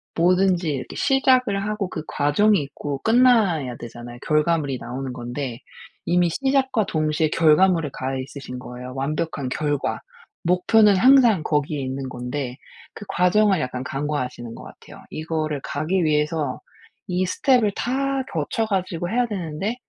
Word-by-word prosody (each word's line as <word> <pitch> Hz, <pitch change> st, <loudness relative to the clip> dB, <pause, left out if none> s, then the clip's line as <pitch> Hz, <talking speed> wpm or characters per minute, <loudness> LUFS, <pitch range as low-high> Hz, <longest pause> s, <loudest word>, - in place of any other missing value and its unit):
뭐든지 180 Hz, 0 st, +2 dB
이렇게 130 Hz, -3 st, -5 dB
시작을 255 Hz, -7 st, +2 dB
하고 210 Hz, -2 st, -2 dB
그 155 Hz, -4 st, -5 dB
과정이 190 Hz, +6 st, +2 dB
있고 140 Hz, 0 st, -5 dB
끝나야 220 Hz, -, +3 dB
되잖아요. 120 Hz, +1 st, -9 dB
결과물이 150 Hz, -3 st, +1 dB
나오는 130 Hz, +1 st, -5 dB
건데. 120 Hz, 0 st, -5 dB, 0.5 s
이미 175 Hz, 0 st, +3 dB
시작과 265 Hz, -, +1 dB
동시에 155 Hz, 0 st, +1 dB
결과물에 165 Hz, 0 st, +4 dB
가 130 Hz, +1 st, -3 dB
있으신 130 Hz, -1 st, -7 dB
거예요. 125 Hz, 0 st, -8 dB
완벽한 140 Hz, 0 st, -2 dB
결과. 145 Hz, 0 st, -1 dB, 0.4 s
목표는 195 Hz, +4 st, +4 dB
항상 235 Hz, -, +5 dB
거기에 150 Hz, -1 st, -1 dB
있는 130 Hz, +1 st, -4 dB
건데 125 Hz, +1 st, -4 dB, 0.4 s
그 -, -, -9 dB
과정을 190 Hz, +2 st, +3 dB
약간 125 Hz, -2 st, -3 dB
간과하시는 130 Hz, -4 st, -4 dB
것 -, -, -10 dB
같아요. -, -, -14 dB
이거를 155 Hz, -2 st, -3 dB
가기 180 Hz, +3 st, -1 dB
위해서 150 Hz, 0 st, 0 dB, 0.5 s
이 180 Hz, +1 st, 0 dB
스텝을 220 Hz, +1 st, +2 dB
다 270 Hz, +1 st, -1 dB
거쳐 165 Hz, +8 st, -1 dB
가지고 185 Hz, -4 st, -2 dB
해야 245 Hz, +3 st, +1 dB
되는데 190 Hz, +1 st, -3 dB
160 Hz, 325 characters per minute, -23 LUFS, 140-200 Hz, 0.5 s, 항상